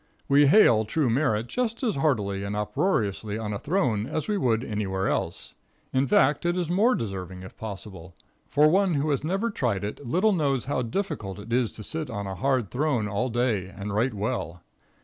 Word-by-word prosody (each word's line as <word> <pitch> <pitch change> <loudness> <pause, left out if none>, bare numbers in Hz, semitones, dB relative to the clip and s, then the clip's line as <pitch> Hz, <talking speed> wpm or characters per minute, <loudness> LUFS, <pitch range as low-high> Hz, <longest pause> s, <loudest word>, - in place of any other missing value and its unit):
We 140 +1 +5
hail 135 - +6
true 130 +3 0
merit 115 -4 +1
just 230 - -2
as 230 - +1
heartily 105 -9 0
and 100 +1 -3
uproariously 105 - -1
on 105 -2 -3
a 100 - -3
throne 130 - 0
as 155 - -3
we 210 - 0
would 120 - +1
anywhere 100 -4 -2
else. - - -2 0.4
In 135 +1 +2
fact, 135 +3 +3
it 175 +1 0
is 175 -2 -1
more 220 +8 +4
deserving, 95 -3 -5
if 95 - -11
possible, 95 -5 -8 0.3
for 150 +1 +5
one 185 +1 +3
who 145 +2 0
has 140 -1 0
never 195 +8 -1
tried 115 - -1
it 105 +7 -5
little 185 - +2
knows 140 -7 0
how 135 -1 -1
difficult 115 - -3
it 105 +3 -6
is 120 -2 +2
to 105 - -8
sit 155 +5 -4
on 100 -3 -4
a 95 - -4
hard 130 0 0
throne 130 -5 0
all 105 +5 -1
day 115 -6 0
and 100 +2 -6
write 115 +3 +1
well. 100 -6 -3
120 Hz, 195 wpm, -26 LUFS, 105-155 Hz, 0.4 s, hail